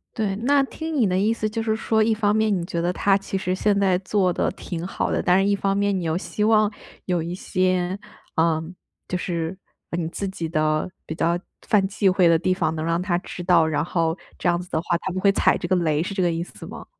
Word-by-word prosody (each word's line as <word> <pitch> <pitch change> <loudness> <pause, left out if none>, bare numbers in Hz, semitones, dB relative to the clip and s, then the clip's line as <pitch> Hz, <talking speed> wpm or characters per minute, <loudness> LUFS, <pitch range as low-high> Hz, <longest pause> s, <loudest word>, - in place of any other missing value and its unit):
对， 210 -4 -1
那 275 +7 +3
听 320 +4 -5
你 245 -7 +3
的 185 0 +1
意 210 +4 +2
思 215 -2 -2
就 225 +1 -3
是 220 -1 +1
说， 220 0 +1
一 225 +1 +2
方 210 -1 +1
面 220 -2 +2
你 175 - -2
觉 170 - -2
得 175 +1 0
他 195 +1 +3
其 195 - -6
实 185 -1 -1
现 205 +1 +1
在 190 -2 +3
做 190 -1 +1
得 - - 0
挺 170 -2 -6
好 190 - -2
的； - - +1
但 180 +1 +5
是 200 - +2
一 200 - +3
方 195 0 0
面 200 -1 +1
你 - - -4
又 160 -1 0
希 210 +3 -2
望， 215 -1 +4 0.3
有 180 -2 0
一 170 - -4
些， 185 0 0 0.4
呃， 160 -1 +2 0.4
就 180 - -1
是， 170 0 -3 0.4
你 165 -2 -1
自 200 +3 -4
己 180 -3 -4
的 155 0 0 0.2
比 160 - -4
较 170 +1 +1 0.3
犯 205 -3 +3
忌 200 0 0
讳 185 -1 +4
的 165 -1 +5
地 185 +3 +1
方 160 -3 -1
能 155 0 -3
让 165 +1 0
他 180 -2 0
知 180 0 -8
道， 175 -2 +4
然 150 -1 0
后， 165 -1 0 0.2
这 - - -2
样 175 0 +2
子 180 - -12
的 160 - 0
话 170 - 0
他 190 - -3
不 185 - -2
会 200 +1 +4
踩 - - +3
这 - - -4
个 185 - +2
雷 155 -3 +1
是 195 - -4
这 195 - -1
个 175 -1 +2
意 165 +1 -2
思 - - -11
吗？ - - -9
185 Hz, 275 characters per minute, -23 LUFS, 170-205 Hz, 0.4 s, 但